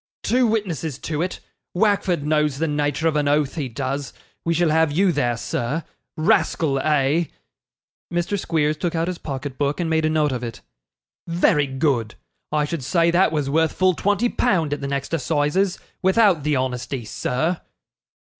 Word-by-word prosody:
'Two 250 Hz, 0 st, +3 dB
witnesses 175 Hz, -, -2 dB
to 155 Hz, +1 st, -3 dB
it; 180 Hz, +1 st, -3 dB, 0.4 s
Wackford 190 Hz, -5 st, +2 dB
knows 150 Hz, -2 st, +1 dB
the 165 Hz, +2 st, 0 dB
nature 145 Hz, +1 st, 0 dB
of 160 Hz, -, +1 dB
an 150 Hz, -1 st, +1 dB
oath, 145 Hz, -1 st, +2 dB
he 145 Hz, -5 st, -3 dB
does; 135 Hz, +3 st, -3 dB, 0.3 s
we 170 Hz, -, 0 dB
shall 165 Hz, -1 st, +2 dB
have 160 Hz, -1 st, +3 dB
you 185 Hz, +5 st, +3 dB
there, 120 Hz, -7 st, 0 dB
sir. 125 Hz, +6 st, -2 dB, 0.3 s
Rascal, 155 Hz, -2 st, +2 dB
eh?' 150 Hz, +3 st, +2 dB, 0.9 s
Mr. 175 Hz, +4 st, -1 dB
Squeers 155 Hz, -4 st, 0 dB
took 170 Hz, +1 st, -2 dB
out 165 Hz, +1 st, 0 dB
his 180 Hz, -1 st, -3 dB
pocketbook 140 Hz, +1 st, -3 dB
and 165 Hz, -2 st, -1 dB
made 160 Hz, 0 st, +2 dB
a -, -, +2 dB
note 155 Hz, -2 st, +2 dB
of 125 Hz, -1 st, -3 dB
it. 115 Hz, -1 st, -6 dB, 0.7 s
'Very 165 Hz, -4 st, +2 dB
good. 130 Hz, -5 st, 0 dB, 0.4 s
I 150 Hz, -1 st, +1 dB
should 155 Hz, -2 st, -4 dB
say 170 Hz, +5 st, +2 dB
that 175 Hz, 0 st, +3 dB
was 150 Hz, -3 st, -1 dB
worth 160 Hz, +3 st, +2 dB
full 185 Hz, 0 st, +3 dB
twenty 205 Hz, +6 st, +1 dB
pound 175 Hz, -12 st, +1 dB
at 145 Hz, -, -4 dB
the 140 Hz, -, -3 dB
next 140 Hz, +2 st, -3 dB
assizes, 160 Hz, +5 st, +1 dB, 0.2 s
without 190 Hz, -3 st, +4 dB
the 150 Hz, +1 st, +1 dB
honesty, 130 Hz, -1 st, -2 dB
sir. 155 Hz, +10 st, -1 dB
155 Hz, 170 wpm, -22 LUFS, 140-170 Hz, 0.9 s, without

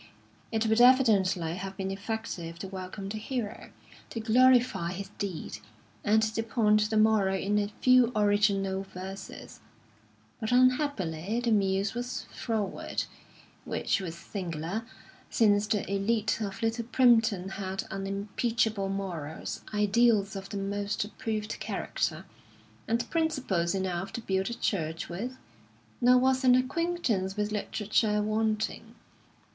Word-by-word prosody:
It 225 Hz, 0 st, 0 dB
would 220 Hz, +1 st, +3 dB
evidently 200 Hz, -10 st, +4 dB
have 195 Hz, +1 st, -6 dB
been 190 Hz, -1 st, -2 dB
effective 195 Hz, -5 st, -5 dB
to 195 Hz, -, -6 dB
welcome 190 Hz, +1 st, -6 dB
the 215 Hz, +2 st, -4 dB
hero, 230 Hz, -2 st, -4 dB, 0.4 s
to 230 Hz, -, -5 dB
glorify 235 Hz, -6 st, +4 dB
his 195 Hz, +1 st, -6 dB
deed, 195 Hz, -6 st, -4 dB, 0.4 s
and 220 Hz, +1 st, +4 dB
to 220 Hz, +1 st, 0 dB
point 215 Hz, -2 st, +2 dB
the 220 Hz, -, +1 dB
moral 215 Hz, -3 st, +4 dB
in 205 Hz, +2 st, +1 dB
a 205 Hz, 0 st, -2 dB
few 255 Hz, -1 st, +5 dB
original 205 Hz, -2 st, +2 dB
verses; 190 Hz, 0 st, -9 dB, 0.8 s
but, 220 Hz, 0 st, -2 dB
unhappily, 245 Hz, -, +2 dB
the 240 Hz, -1 st, 0 dB
muse 195 Hz, -1 st, +2 dB
was 245 Hz, +1 st, -4 dB
froward, 220 Hz, -5 st, -2 dB, 0.6 s
which -, -, -1 dB
was 170 Hz, -3 st, -5 dB
singular, 175 Hz, +3 st, -4 dB, 0.4 s
since 205 Hz, -2 st, +3 dB
the 210 Hz, -2 st, +1 dB
élite 210 Hz, +3 st, 0 dB
of 200 Hz, +1 st, -4 dB
Little 225 Hz, +1 st, 0 dB
Primpton 225 Hz, -6 st, +3 dB
had 190 Hz, -1 st, -3 dB
unimpeachable 200 Hz, +2 st, -1 dB
morals, 180 Hz, -6 st, -4 dB
ideals 210 Hz, 0 st, +3 dB
of 195 Hz, 0 st, -6 dB
the 205 Hz, -, -4 dB
most 200 Hz, +1 st, -2 dB
approved 215 Hz, 0 st, -4 dB
character, -, -, -2 dB, 0.6 s
and 235 Hz, +1 st, 0 dB
principles 265 Hz, -, 0 dB
enough 190 Hz, -1 st, -2 dB
to 235 Hz, -, -4 dB
build 190 Hz, -1 st, -1 dB
a 235 Hz, -, -4 dB
church 165 Hz, -8 st, -2 dB
with; 235 Hz, +9 st, -5 dB, 0.6 s
nor 250 Hz, +1 st, +6 dB
was 260 Hz, +1 st, +2 dB
an 250 Hz, -1 st, +6 dB
acquaintance 255 Hz, -, 0 dB
with 210 Hz, 0 st, -1 dB
literature 210 Hz, 0 st, 0 dB
wanting. 220 Hz, +1 st, -1 dB
210 Hz, 130 wpm, -29 LUFS, 195-230 Hz, 0.8 s, nor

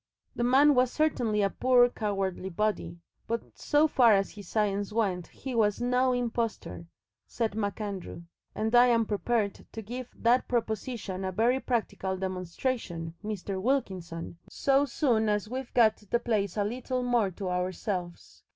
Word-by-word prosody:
"The 240 Hz, -, -1 dB
man 275 Hz, +4 st, +5 dB
was 250 Hz, -1 st, +3 dB
certainly 240 Hz, -9 st, +1 dB
a 195 Hz, -, +1 dB
poor, 250 Hz, -1 st, +4 dB
cowardly 195 Hz, -5 st, -2 dB
body, 185 Hz, -3 st, -2 dB, 0.3 s
but 230 Hz, 0 st, -1 dB, 0.2 s
so 300 Hz, +1 st, +3 dB
far 245 Hz, -7 st, +5 dB
as 195 Hz, -1 st, +1 dB
his 205 Hz, -3 st, -11 dB
science 205 Hz, -1 st, 0 dB
went 195 Hz, -6 st, -1 dB
he 265 Hz, -, -7 dB
was 210 Hz, -3 st, +2 dB
NO 250 Hz, +1 st, +2 dB
impostor," 235 Hz, -7 st, -3 dB, 0.4 s
said 225 Hz, -4 st, -2 dB
MacAndrew, 200 Hz, -4 st, -4 dB, 0.3 s
"and 220 Hz, +1 st, -1 dB
I'm 240 Hz, -2 st, +5 dB
prepared 205 Hz, 0 st, -1 dB
to 225 Hz, -, -6 dB
give 245 Hz, +3 st, -6 dB
that 240 Hz, +2 st, +2 dB
proposition 220 Hz, -4 st, -2 dB
a 190 Hz, -, -2 dB
very 235 Hz, +7 st, +2 dB
practical 210 Hz, -7 st, -2 dB
demonstration, 185 Hz, -1 st, -3 dB
Mr. 200 Hz, -2 st, -4 dB
Wilkinson, 185 Hz, -10 st, -2 dB
so 275 Hz, +1 st, +2 dB
soon 235 Hz, -7 st, +1 dB
as 210 Hz, 0 st, 0 dB
we've 260 Hz, -1 st, -5 dB
got 225 Hz, -3 st, +5 dB
the 210 Hz, +3 st, -1 dB
place 215 Hz, -5 st, -1 dB
a 205 Hz, -, +2 dB
little 250 Hz, +4 st, -2 dB
more 240 Hz, -5 st, +2 dB
to 190 Hz, +1 st, -5 dB
ourselves. 180 Hz, 0 st, -4 dB
220 Hz, 150 wpm, -29 LUFS, 195-245 Hz, 0.4 s, man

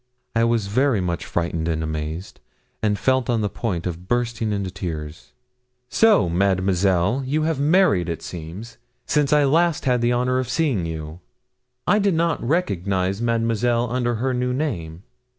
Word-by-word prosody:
I 115 Hz, 0 st, +3 dB
was 115 Hz, -3 st, +1 dB
very 125 Hz, +3 st, +2 dB
much 85 Hz, -2 st, -2 dB
frightened 85 Hz, -1 st, -2 dB
and 80 Hz, -1 st, -1 dB
amazed, 80 Hz, +3 st, -5 dB, 0.4 s
and 105 Hz, -2 st, +1 dB
felt 130 Hz, 0 st, +1 dB
on 115 Hz, -2 st, +1 dB
the 105 Hz, -, 0 dB
point 90 Hz, -8 st, -3 dB
of 90 Hz, 0 st, -5 dB
bursting 120 Hz, -2 st, -1 dB
into 100 Hz, -2 st, -2 dB
tears. 80 Hz, -4 st, -6 dB, 0.6 s
'So, 210 Hz, -, +4 dB
Mademoiselle, 95 Hz, +4 st, +1 dB
you 150 Hz, +4 st, 0 dB
have 160 Hz, -3 st, 0 dB
married, 145 Hz, -, +3 dB
it 85 Hz, -, -4 dB
seems, 90 Hz, +9 st, -8 dB, 0.3 s
since 145 Hz, -2 st, +1 dB
I 150 Hz, 0 st, +5 dB
had 140 Hz, -, +3 dB
last 165 Hz, +2 st, +2 dB
the 120 Hz, -2 st, +2 dB
honour 125 Hz, +1 st, +1 dB
of 130 Hz, -1 st, -3 dB
seeing 130 Hz, -, 0 dB
you? 80 Hz, 0 st, -6 dB, 0.7 s
I 210 Hz, -, +3 dB
did 200 Hz, -4 st, +2 dB
not 165 Hz, 0 st, 0 dB
recognise 100 Hz, -, 0 dB
Mademoiselle 115 Hz, +1 st, +1 dB
under 120 Hz, -1 st, 0 dB
her 130 Hz, +4 st, -1 dB
new 125 Hz, 0 st, -1 dB
name.' 90 Hz, -, -3 dB
115 Hz, 160 wpm, -22 LUFS, 90-130 Hz, 0.7 s, I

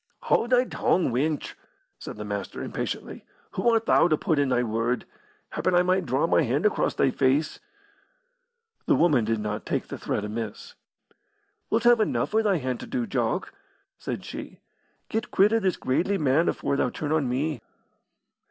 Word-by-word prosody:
"Haud 235 Hz, -, +2 dB
thy 250 Hz, -1 st, +5 dB
tongue, 180 Hz, -, +1 dB
wench!" 145 Hz, +5 st, -1 dB, 0.5 s
said -, -, -8 dB
the 105 Hz, -, -6 dB
Master, 100 Hz, -1 st, -5 dB
impatiently. -, -, -5 dB, 0.3 s
"Who 190 Hz, +6 st, +1 dB
art 225 Hz, -1 st, +2 dB
thou -, -, +5 dB
to 155 Hz, -3 st, +2 dB
put 155 Hz, -1 st, 0 dB
in 140 Hz, -2 st, +2 dB
thy 125 Hz, -1 st, +2 dB
word? 115 Hz, +2 st, -1 dB, 0.5 s
Happen 185 Hz, -, 0 dB
I 175 Hz, -, +5 dB
might 185 Hz, -1 st, +1 dB
draw 130 Hz, +5 st, +1 dB
my 165 Hz, -, +3 dB
hand 140 Hz, -, 0 dB
across 210 Hz, -, +1 dB
thy 135 Hz, -, +2 dB
face." 140 Hz, +4 st, +1 dB, 1.3 s
The -, -, +4 dB
woman 145 Hz, -10 st, +3 dB
did 110 Hz, 0 st, 0 dB
not 105 Hz, 0 st, -3 dB
take -, -, -3 dB
the -, -, -6 dB
threat 105 Hz, -, -2 dB
amiss. 110 Hz, 0 st, -6 dB, 1.0 s
"Wilt 225 Hz, +1 st, +1 dB
have 240 Hz, -1 st, +6 dB
enough 215 Hz, -, 0 dB
for 220 Hz, +1 st, +3 dB
thy 205 Hz, -4 st, +2 dB
hand 130 Hz, -4 st, -3 dB
to -, -, -8 dB
do, 250 Hz, -3 st, -2 dB
Jock," 220 Hz, -, -2 dB, 0.5 s
said -, -, -5 dB
she. -, -, -8 dB, 0.5 s
"Get 225 Hz, 0 st, -3 dB
quit 205 Hz, +3 st, +4 dB
o' 225 Hz, -, +4 dB
this 190 Hz, -4 st, 0 dB
gradely 180 Hz, +10 st, 0 dB
man 150 Hz, +2 st, +2 dB
afore 140 Hz, -, -1 dB
thou 125 Hz, -, +1 dB
turn 150 Hz, +4 st, -4 dB
on 155 Hz, -5 st, +1 dB
me." 135 Hz, +1 st, -1 dB
150 Hz, 180 wpm, -26 LUFS, 125-195 Hz, 1.3 s, have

